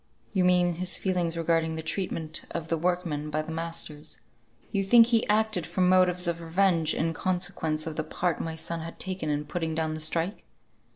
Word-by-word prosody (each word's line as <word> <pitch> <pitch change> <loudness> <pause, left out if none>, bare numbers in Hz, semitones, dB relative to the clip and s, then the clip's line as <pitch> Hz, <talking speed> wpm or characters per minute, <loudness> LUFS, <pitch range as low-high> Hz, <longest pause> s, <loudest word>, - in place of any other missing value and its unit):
"You 190 -3 +2
mean 180 -1 +4
his 180 +2 +1
feelings 175 -3 -1
regarding 165 -1 +1
the 160 - -4
treatment 160 -2 -3
of 165 -1 -5
the 165 - +1
workmen 170 -4 -1
by 155 +1 -1
the 160 - -7
masters; 160 -2 -4 0.5
you 200 -2 +1
think 230 +4 +7
he 230 -1 +2
acted 215 -5 +2
from 185 -1 +1
motives 180 -1 +4
of 170 0 -1
revenge, 165 -1 +2
in 165 +1 0
consequence 175 -4 0
of 160 -1 -5
the 155 - 0
part 170 +1 -1
my 165 0 -4
son 165 +1 -2
had 165 +1 -7
taken 185 -4 -2
in 150 0 -1
putting 160 +1 -3
down 160 -1 -1
the 155 - -5
strike?" 165 +5 -1
170 Hz, 190 wpm, -27 LUFS, 160-185 Hz, 0.5 s, think